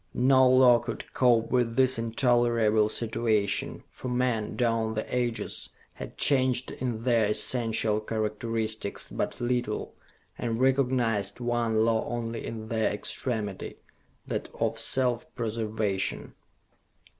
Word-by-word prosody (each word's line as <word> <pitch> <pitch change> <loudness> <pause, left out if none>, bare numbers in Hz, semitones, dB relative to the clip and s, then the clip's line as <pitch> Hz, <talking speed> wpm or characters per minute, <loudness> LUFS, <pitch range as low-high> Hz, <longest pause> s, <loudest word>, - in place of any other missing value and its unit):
No 130 +1 +5
law 125 -2 +6
could 115 -1 -7
cope 120 -3 +3
with 120 -2 +1
this 130 -1 +3
intolerable 115 -2 +2
situation, 110 -3 0
for - - -8
men, 125 -3 -1
down 115 -2 0
the 110 - -2
ages, 120 -2 -2 0.2
had - - -9
changed 130 -3 +2
in 120 -3 -4
their 115 -4 +3
essential 110 -1 +2
characteristics 110 0 -3
but - - -3
little 120 -3 -2 0.5
and 115 -2 -2
recognized 125 -6 +1
one 120 -2 +1
law 115 -1 +2
only 115 -1 -4
in 110 -1 -6
their 110 -1 +1
extremity, 105 -1 -4 0.5
that - - -4
of - - 0
self 125 -3 0
preservation. 110 -4 -2
115 Hz, 115 wpm, -27 LUFS, 110-125 Hz, 0.5 s, law